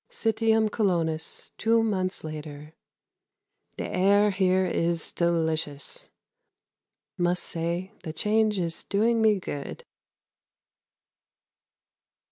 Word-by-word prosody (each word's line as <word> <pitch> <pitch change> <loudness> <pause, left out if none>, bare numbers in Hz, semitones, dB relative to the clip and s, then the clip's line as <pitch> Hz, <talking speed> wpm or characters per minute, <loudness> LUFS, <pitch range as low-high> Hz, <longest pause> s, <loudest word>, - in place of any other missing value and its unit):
Citium 225 -1 +2
Colonnus, 165 -7 -1
two 225 +1 +3
months 185 -4 -1
later. 150 -1 -7 1.0
The - - -3
air 200 +3 +3
here 185 -1 +2
is 170 -1 -1
delicious. 165 - -1 1.1
Must 175 0 +1
say 170 +3 -3
the 160 - -5
change 210 +5 +1
is 170 -2 -3
doing 225 +3 +2
me 215 -2 +4
good. 145 -6 -6
185 Hz, 90 wpm, -27 LUFS, 165-210 Hz, 1.1 s, me